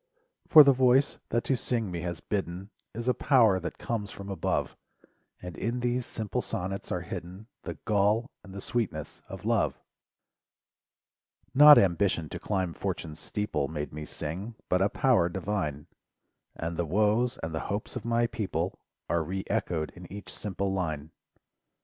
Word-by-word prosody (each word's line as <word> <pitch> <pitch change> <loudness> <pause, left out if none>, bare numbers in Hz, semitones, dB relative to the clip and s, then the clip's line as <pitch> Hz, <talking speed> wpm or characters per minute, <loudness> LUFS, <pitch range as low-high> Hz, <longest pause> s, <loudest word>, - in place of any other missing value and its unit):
For 155 -2 +10
the 140 -1 +6
voice 130 +2 +3
that 120 +1 +1
to 135 - +1
sing 115 -5 -2
me 85 - -3
has 85 -1 -4
bidden 95 0 -3 0.2
Is 115 +2 -4
a 125 - +4
power 115 -11 +4
that 90 - -5
comes 110 -4 -3
from 100 0 -9
above. 95 - -1 0.7
And 90 -2 -6
in 120 +7 -2
these 125 0 0
simple 110 -3 -3
sonnets 95 +2 -4
are 90 - -1
hidden 90 +4 -7 0.2
The - - -4
gall 105 +5 +2
and 100 - -12
the 100 +1 -7
sweetness 120 -2 -3
of - - -8
love. - - +1 1.7
Not 150 +2 +10
ambition 85 -3 +2
to - - -6
climb 95 -4 -1
Fortune's 80 0 -4
steeple 80 -7 -2
Made 75 -1 -5
me 75 0 -5
sing, 95 +11 -5
but 90 +1 +3
a 100 - +4
power 115 -11 +3
divine; 85 -5 -2 0.7
And 85 0 -4
the 85 - 0
woes, 110 - +2
and 80 0 -3
the 80 - -1
hopes 105 +5 -3
of 125 - -4
my 120 0 +2
People! 95 -6 -2 0.3
Are 85 -1 +1
re 95 +4 -3
echoed 80 -2 -1
in 90 -1 -12
each 100 0 -8
simple 100 -1 -2
line. 80 -5 -3
100 Hz, 160 wpm, -29 LUFS, 85-115 Hz, 1.7 s, For